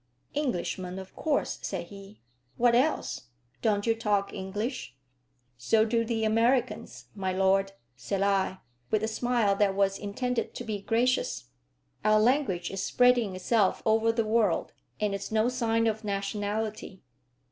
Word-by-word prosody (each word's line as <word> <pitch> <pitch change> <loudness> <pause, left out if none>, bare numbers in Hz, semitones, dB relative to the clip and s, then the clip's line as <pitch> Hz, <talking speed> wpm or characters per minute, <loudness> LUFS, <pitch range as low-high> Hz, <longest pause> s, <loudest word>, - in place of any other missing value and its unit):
"Englishmen, 185 - -2
of 190 0 -9
course," 300 -3 -1
said 180 -3 -4
he. 200 +1 -12 0.4
"What 240 0 +4
else? 250 - 0 0.3
Don't 205 -2 +1
you 230 - +3
talk 210 -3 0
English?" 205 - -4 0.6
"So 220 - +3
do 230 +1 +1
the 225 -1 -1
Americans, 235 +3 +1
my 190 -2 -2
lord," 195 +1 +2 0.2
said 190 +10 -2
I, 195 -1 +1 0.3
with 215 0 +1
a - - +1
smile 225 -3 +1
that 200 -2 +2
was 195 0 +1
intended 235 +4 -2
to - - -5
be 215 -3 -4
gracious. 240 +4 0 0.5
"Our 215 0 +4
language 215 -7 +1
is 195 - -3
spreading 245 -4 +3
itself 195 +2 +1
over 225 +1 +3
the 230 -1 0
world, 220 0 +1 0.3
and 210 -1 0
is 200 +1 -5
no 220 +2 +2
sign 230 -2 +1
of 220 0 -1
nationality." 205 0 -3
215 Hz, 145 wpm, -28 LUFS, 195-230 Hz, 0.6 s, What